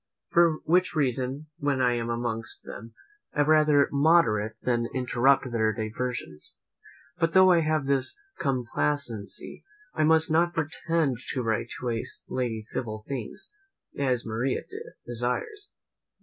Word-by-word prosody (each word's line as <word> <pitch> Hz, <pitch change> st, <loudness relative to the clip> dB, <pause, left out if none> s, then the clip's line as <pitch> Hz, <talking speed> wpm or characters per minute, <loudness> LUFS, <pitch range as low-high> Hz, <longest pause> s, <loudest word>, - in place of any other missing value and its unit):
For 170 Hz, -1 st, +5 dB
which 180 Hz, +2 st, +2 dB
reason, 135 Hz, 0 st, -1 dB
when 140 Hz, -2 st, 0 dB
I 125 Hz, -1 st, +3 dB
am 120 Hz, -1 st, -2 dB
amongst 115 Hz, -1 st, -3 dB
them, 115 Hz, +1 st, -10 dB, 0.4 s
I 150 Hz, -, +3 dB
rather 150 Hz, -1 st, +4 dB
moderate 140 Hz, -8 st, +3 dB
than 120 Hz, -2 st, +1 dB
interrupt 130 Hz, +1 st, +2 dB
their 110 Hz, -2 st, +2 dB
diversions. 110 Hz, -7 st, -4 dB, 0.6 s
But 165 Hz, -1 st, +1 dB
though 185 Hz, 0 st, +7 dB
I 175 Hz, -, +5 dB
have 155 Hz, -2 st, 0 dB
this 135 Hz, -1 st, +1 dB, 0.2 s
complacency, 130 Hz, -, -2 dB, 0.3 s
I -, -, +1 dB
must 160 Hz, 0 st, +4 dB
not 170 Hz, +2 st, +2 dB
pretend 160 Hz, -3 st, 0 dB, 0.2 s
to 130 Hz, -, -1 dB
write 115 Hz, +1 st, -1 dB
to 125 Hz, -, -2 dB
a 115 Hz, -1 st, -2 dB, 0.2 s
lady 120 Hz, -4 st, -2 dB
civil 110 Hz, -1 st, -5 dB
things, 130 Hz, -6 st, -5 dB, 0.4 s
as 130 Hz, -4 st, 0 dB
Maria 115 Hz, +4 st, -1 dB, 0.4 s
desires. 125 Hz, -, -2 dB
130 Hz, 130 wpm, -27 LUFS, 115-155 Hz, 0.6 s, though